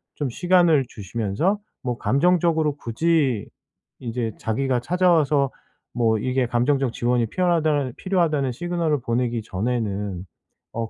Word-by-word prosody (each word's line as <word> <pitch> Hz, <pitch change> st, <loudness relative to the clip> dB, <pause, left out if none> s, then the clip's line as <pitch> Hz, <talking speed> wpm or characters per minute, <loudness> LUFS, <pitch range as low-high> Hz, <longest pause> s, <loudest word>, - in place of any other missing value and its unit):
좀 145 Hz, -, -2 dB
시간을 175 Hz, 0 st, +3 dB
주시면서 110 Hz, -, -1 dB, 0.2 s
뭐 125 Hz, -2 st, -3 dB
감정적으로 160 Hz, 0 st, +2 dB
굳이 135 Hz, -3 st, 0 dB, 0.5 s
이제 115 Hz, -3 st, -3 dB
자기가 125 Hz, +2 st, -1 dB
찾아와서 155 Hz, -3 st, +2 dB, 0.4 s
뭐 115 Hz, -2 st, +2 dB
이게 130 Hz, +3 st, 0 dB
감정적 125 Hz, +2 st, +1 dB
지원이 120 Hz, -1 st, +1 dB
필요하다라는 155 Hz, -, +1 dB
필요하다는 160 Hz, -8 st, 0 dB
시그널을 165 Hz, 0 st, -1 dB
보내기 120 Hz, -1 st, -1 dB
전에는 105 Hz, -3 st, -3 dB, 0.5 s
어 115 Hz, -1 st, -3 dB
130 Hz, 310 characters per minute, -23 LUFS, 115-160 Hz, 0.5 s, 시간을